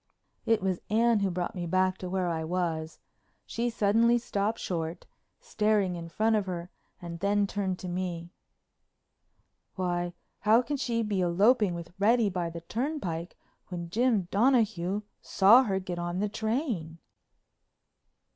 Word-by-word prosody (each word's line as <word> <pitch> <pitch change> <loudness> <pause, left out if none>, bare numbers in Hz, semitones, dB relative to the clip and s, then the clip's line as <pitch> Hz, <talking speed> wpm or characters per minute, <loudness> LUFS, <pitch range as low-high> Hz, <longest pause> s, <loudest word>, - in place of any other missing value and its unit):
It 225 -3 +2
was 185 -2 0
Anne 230 +1 +3
who 200 -1 +1
brought 175 -1 -3
me 175 -2 -4
back 185 +1 +1
to 185 - -5
where 185 -1 0
I 165 -2 -1
was. 160 -2 -2 0.5
She 235 +1 -2
suddenly 230 +2 +3
stopped 220 -1 -1
short, 165 -1 -4 0.3
staring 210 - +1
in 170 -1 -7
front 220 +5 +1
of 205 -2 0
her 175 -1 -5 0.3
and 170 -1 -7
then 205 +2 +2
turned 195 -2 -2
to 185 - -7
me: 175 -1 -4 1.4
"Why, 175 -1 -1 0.3
how 220 +4 +4
can 290 +3 -2
she 235 -3 -1
be 205 -3 -1
eloping 195 +3 +3
with 170 0 -8
Reddy 220 0 +3
by 175 -2 -2
the 170 0 -8
turnpike 185 - -4 0.3
when 170 -2 -6
Jim 225 -4 +2
Donahue 210 -4 +2 0.2
saw 225 +7 +6
her 195 -3 0
get 180 -2 -5
on 175 +1 -3
the 205 +2 0
train?" 220 - -2
190 Hz, 145 wpm, -29 LUFS, 175-220 Hz, 1.4 s, saw